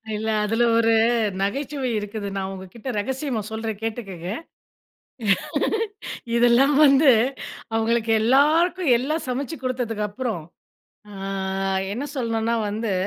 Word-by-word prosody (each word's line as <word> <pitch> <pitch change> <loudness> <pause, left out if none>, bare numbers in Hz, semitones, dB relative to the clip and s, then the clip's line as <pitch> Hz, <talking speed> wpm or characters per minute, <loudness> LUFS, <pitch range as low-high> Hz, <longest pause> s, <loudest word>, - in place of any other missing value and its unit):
இல்ல 220 +1 -3 0.2
அதில 225 +3 +1
ஒரு, 230 0 +4 0.5
நகைச்சுவை 265 +5 -2
இருக்குது. 205 0 -5
நான் 190 0 -2
உங்ககிட்ட 190 +7 -8
ரகசியமா 260 +1 -2
சொல்றேன் 220 -1 -4
கேட்டுக்கங்க. 195 -6 -5 2.1
இதெல்லாம் 245 +4 +4
வந்து 275 0 +6 0.6
அவுங்களுக்கு 225 0 +1
எல்லாருக்கும், 310 +7 +3
எல்லாம் 305 +6 -2
சமைச்சு 280 +5 -3
கொடுத்ததுக்கு 240 -4 -2
அப்புறம், 220 -6 -3 0.7
ஆ - - -10 0.8
என்ன 255 +7 -3
சொல்லணும்ன்னா 230 -2 0
வந்து, 215 0 -2
235 Hz, 100 wpm, -23 LUFS, 215-265 Hz, 2.1 s, வந்து